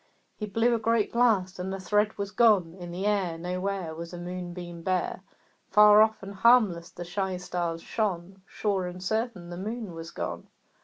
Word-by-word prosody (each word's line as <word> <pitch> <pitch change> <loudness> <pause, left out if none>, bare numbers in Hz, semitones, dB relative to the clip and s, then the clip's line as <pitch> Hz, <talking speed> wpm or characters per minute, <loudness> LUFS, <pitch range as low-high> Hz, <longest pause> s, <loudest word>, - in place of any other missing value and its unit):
He 210 - -5
blew 225 +4 +2
a 230 - +1
great 225 -1 +1
blast, 205 -6 +2
and 185 +1 -3
the 195 - -4
thread 210 +3 +1
was 200 0 -3
gone; 205 -9 +4
In 175 -1 -7
the 180 +3 -4
air 195 -5 +1
Nowhere 180 0 -3
Was 170 +2 -8
a - - -6
moonbeam 175 -1 -6
bare; 185 +1 -1 0.5
Far 210 +1 +7
off 220 -2 +2
and 195 +1 -7
harmless 200 -5 +4
the 175 - -8
shy 190 +1 -2
stars 175 -2 -3
shone; 190 -3 -3
Sure 195 -4 -1
and 180 +1 -7
certain 220 -4 -2
the 175 - -6
Moon 215 0 -5
was 165 0 -7
gone. - - -5
190 Hz, 185 wpm, -28 LUFS, 175-210 Hz, 0.5 s, Far